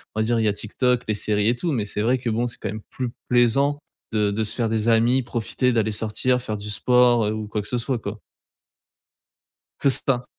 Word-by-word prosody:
on - - -1
va - - +2
dire 115 +1 +1
il 110 - +1
y - - +3
a - - 0
TikTok, 125 +4 0
les 110 - 0
séries 105 0 0
et 120 - +2
tout, 165 +7 -2
mais 115 -7 -1
c'est 105 - -3
vrai 125 +4 +2
que 120 -1 -2
bon, 115 +2 0
c'est 120 - -5
quand 105 - -4
même 110 +2 -6
plus 125 -2 -3 0.2
plaisant 135 +4 +3 0.3
de 105 -2 +2
de 110 +2 -1
se 105 - -2
faire 115 -3 0
des 110 0 0
amis, 120 +3 +3
profiter 120 +1 -1
d'aller 110 -2 +1
sortir, 110 +4 0
faire 110 -3 -4
du 105 +1 -6
sport, 120 +1 +3
heu, 105 - 0
ou 110 -1 -4
quoi 105 0 -2
que 105 - -6
ce 125 - 0
soit 125 +2 -1
quoi. - - -6 1.6
C'est 140 - +4 0.2
ça. 125 -2 +1
115 Hz, 245 wpm, -23 LUFS, 110-125 Hz, 1.6 s, C'est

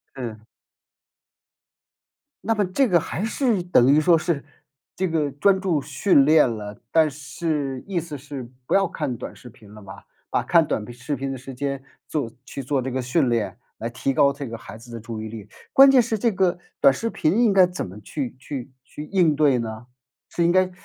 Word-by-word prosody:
嗯。 115 -4 -6 2.0
那 225 - +1
么 205 -2 +1
这 240 +9 +1
个 175 -4 +4
还 175 +5 -4
是 230 -4 0
等 140 -6 +4
于 150 - +5
说 165 +1 +5
是， 155 -3 -2 0.5
这 185 - 0
个 155 -3 0
专 190 +7 +3
注 175 -7 0
训 145 +1 +3
练 150 -3 +5
了， 105 -2 -7
但 160 -2 +4
是 145 -2 -3
意 190 -3 -1
思 155 -3 -6
是 135 -3 -8 0.2
不 - - -2
要 195 -1 +4
看 140 -8 -4
短 - - -8
视 125 - -13
频 105 -2 -17
了 105 - -12
吧， 100 0 -12 0.2
把 - - +1
看 165 -2 +4
短 110 -1 -3
视 140 +4 -4
频 135 +1 -3
的 135 - -4
时 135 +1 -9
间 140 +1 -3 0.2
做 140 -8 -2
去 140 - -7
做 135 0 0
这 130 +1 -4
个 130 0 -1
训 130 +1 +1
练， 110 -3 -1 0.2
来 115 - -4
提 130 +3 -2
高 140 -1 +4
这 140 -1 -6
个 115 0 -6
孩 110 0 -11
子 120 +1 -14
的 115 - -5
注 115 -1 -6
意 110 - -5
力。 105 -2 -9 0.2
关 270 0 +8
键 255 -2 +6
是 225 -1 -1
这 230 +2 +1
个 185 -2 +1 0.2
短 135 - +6
视 230 +12 -3
频 165 +2 0
应 220 - +4
该 190 -2 +6
怎 180 - -5
么 95 +3 -10
去 130 +4 -5
去 135 -2 -7
去 150 - -8
应 170 -4 +2
对 145 -4 +3
呢？ 110 +1 -6 0.4
是 170 - -1
应 170 - +4
该 185 0 +3
145 Hz, 225 characters per minute, -23 LUFS, 125-175 Hz, 2.0 s, 关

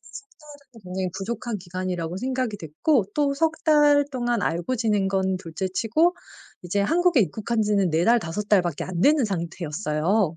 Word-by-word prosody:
3 270 +7 -9
달은 285 -6 -16
굉장히 185 +1 -3
부족한 225 +2 -4
기간이라고 180 -1 -4
생각이 255 0 -2
됐고 195 - 0
또 290 -2 +1
3 320 +2 +1
달 295 -2 +5
동안 240 -4 -1
알고 170 +10 -1
지낸 210 -4 +1
건 190 -1 0
둘째 185 +1 -5
치고 235 - +1 0.5
이제 180 +3 -1
한국에 335 - +3
입국한 220 +2 -1
지는 205 -4 +1
4 160 +2 +1
달, 240 +4 +5
5 205 +2 -5
달밖에 175 -7 +2
안 180 -2 -4
되는 290 - +4
상태였어요. 170 0 -1
205 Hz, 305 characters per minute, -24 LUFS, 180-255 Hz, 0.5 s, 달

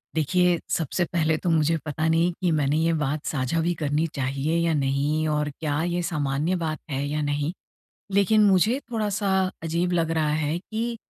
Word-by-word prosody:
देखिए, 175 +3 +2
सबसे 165 +2 0
पहले 160 -2 +2
तो 175 - +1
मुझे 165 0 +2
पता 155 +1 -1
नहीं 165 +2 +3
कि 180 - +2
मैंने 150 -1 +1
ये 165 +1 +2
बात 150 -1 -2
साझा 135 +2 -1
भी 175 +1 +1
करनी 150 0 0
चाहिए 140 +4 -1
या 165 - +2
नहीं, 145 +2 0
और 150 -1 0
क्या 150 -1 -1
ये 175 0 -1
सामान्य 150 0 -1
बात 160 -3 -2
है 135 +1 -1
या 150 +1 -2
नहीं। 145 +2 -1 0.6
लेकिन 210 +2 +4
मुझे 205 +6 +3
थोड़ा-सा 205 -3 -1 0.3
अजीब 170 +2 0
लग 165 -2 +1
रहा 155 -1 +1
है 150 +3 0
कि, 230 +4 -4
160 Hz, 180 wpm, -25 LUFS, 150-175 Hz, 0.6 s, लेकिन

